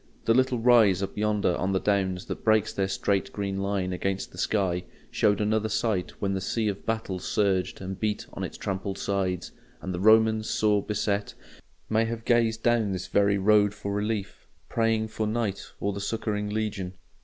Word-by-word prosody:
The 115 - +4
little 130 0 +2
rise 110 -5 +5
up 95 - -4
yonder 105 -4 +1
on 95 +2 -1
the 95 - +2
Downs 95 -3 0
that - - -6
breaks 110 -1 +3
their 95 -1 0
straight 100 0 0
green 100 -1 -3
line 95 -2 -1
against 95 +1 -2
the 90 - -11
sky 95 -4 0 0.3
showed 105 -1 +2
another 110 +1 +1
sight 105 -4 -1
when 100 -1 0
the 95 - -2
sea 110 +3 -1
of 100 -1 -6
battle 110 -5 -2
surged 95 -1 0
and 95 0 -5
beat 105 -1 -1
on - - -5
its - - -5
trampled 95 0 -3
sides; 95 -3 -2 0.3
and 95 - -5
the 90 - -3
Roman, 110 +2 +5
sore 110 -2 +1
beset, 105 0 -2 0.5
may 110 +1 +2
have 115 0 -5
gazed 115 -2 +2
down 115 -4 +2
this 90 -1 -4
very 100 0 +2
road 105 +1 +4
for 100 -1 -4
relief, 105 -1 -3 0.2
praying 115 -1 +1
for 110 0 -2
night 110 -3 -2
or 100 - -1
the 100 - -5
succouring 105 -1 -2
legion. 105 -4 -3
105 Hz, 185 wpm, -27 LUFS, 95-110 Hz, 0.5 s, rise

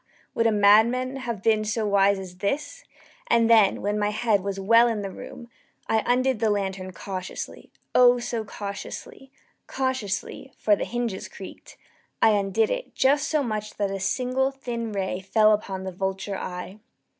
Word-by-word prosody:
would 230 - +2
a - - +3
madman 220 +6 +4
have 235 -6 -5
been 220 -1 +3
so 215 +1 -1
wise 200 -1 +3
as 185 -2 -9
this, 295 - -3 0.4
And 230 - +3
then, 220 -4 +4
when 205 +1 0
my 205 0 +1
head 215 -1 +1
was 195 0 -4
well 230 +5 +5
in 220 -3 -2
the 195 - -5
room, 235 +5 -10 0.4
I 220 0 +2
undid 255 -1 +2
the 220 -1 +2
lantern 190 -2 -2
cautiously 185 0 -7 0.2
oh, 245 0 +6
so 240 -2 -3
cautiously 220 - -8 0.4
cautiously 260 0 -3
(for 210 - +3
the - - -3
hinges 235 -5 -3
creaked) - - -12 0.4
I 220 - +5
undid 205 +1 +1
it - - -4
just 275 +2 +3
so 305 -2 +1
much 215 -3 -4
that 200 -1 -1
a 195 - -3
single 255 +6 0
thin 240 -4 -5
ray 190 -2 -2
fell 215 +3 +3
upon 195 -2 -3
the 190 - -4
vulture 190 +2 -3
eye. 185 +2 -6
215 Hz, 170 wpm, -25 LUFS, 195-245 Hz, 0.4 s, oh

